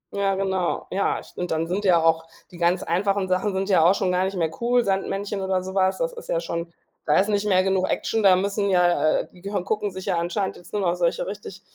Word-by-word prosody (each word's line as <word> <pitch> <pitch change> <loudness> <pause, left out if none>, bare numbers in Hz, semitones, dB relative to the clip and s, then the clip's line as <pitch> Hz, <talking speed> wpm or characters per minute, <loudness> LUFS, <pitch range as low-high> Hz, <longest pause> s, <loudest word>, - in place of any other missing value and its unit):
Ja, 195 -1 +1
genau. 190 -2 -1
Ja, 195 +1 0
ich - - -16
finde 180 - -4
dann 160 -1 -1
sind 190 +4 -2
ja 180 -2 +5
auch 165 0 +2 0.2
die 175 - -12
ganz 175 +1 +2
einfachen 195 +3 0
Sachen 185 +3 0
sind 190 0 -1
ja 185 -5 +4
auch 180 +4 +5
schon 185 -2 0
gar 180 +1 +1
nicht 195 +1 -3
mehr 165 -2 0
cool, 245 +1 +3
Sandmännchen 195 0 -2
oder 190 -1 0
so 190 - -6
was, 190 -1 +2
das - - -2
ist 475 +1 -11
ja - - +1
schon 170 - -4 0.3
da 150 - +3
ist 200 +3 +1
nicht 205 0 0
mehr 185 -2 +4
genug 190 -1 +1
Action, 225 - 0
da 190 -2 +7
müssen 200 +2 0
ja, 175 -4 +3
äh, - - -10
die 180 - -17
gehö 200 -1 -2
gucken 210 +1 -1
sich 190 0 -8
ja 175 - 0
anscheinend 175 +4 -2
jetzt 175 - -15
nur 205 -1 -1
noch 175 -2 +2
solche 175 -1 0
richtig 200 -1 -8
190 Hz, 255 wpm, -24 LUFS, 180-200 Hz, 0.3 s, da